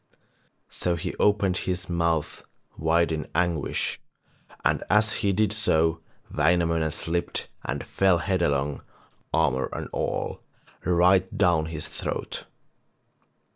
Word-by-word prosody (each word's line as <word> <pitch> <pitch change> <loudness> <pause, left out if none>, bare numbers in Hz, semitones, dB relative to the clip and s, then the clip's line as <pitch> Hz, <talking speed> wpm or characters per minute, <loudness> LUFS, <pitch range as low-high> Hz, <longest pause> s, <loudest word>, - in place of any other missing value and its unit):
So 90 -1 0
he 80 - -4
opened 100 -3 +2
his 90 0 -2
mouth 85 -3 -1 0.3
wide 80 +1 +2
in 80 -1 -3
anguish, 85 -3 0 0.7
and - - +2
as 105 +1 +4
he 100 -2 +2
did 105 +1 +2
so 80 -7 +2 0.3
Wainamoinen 80 0 +2
slipped 85 +3 -2
and - - -3
fell 95 -2 +2
headlong, 80 -7 0 0.5
armour 65 0 +1
and - - -5
all, - - -2 0.4
right 90 +2 +3
down 85 -5 +3
his 80 -2 -4
throat. - - -5
85 Hz, 110 wpm, -26 LUFS, 80-95 Hz, 0.7 s, as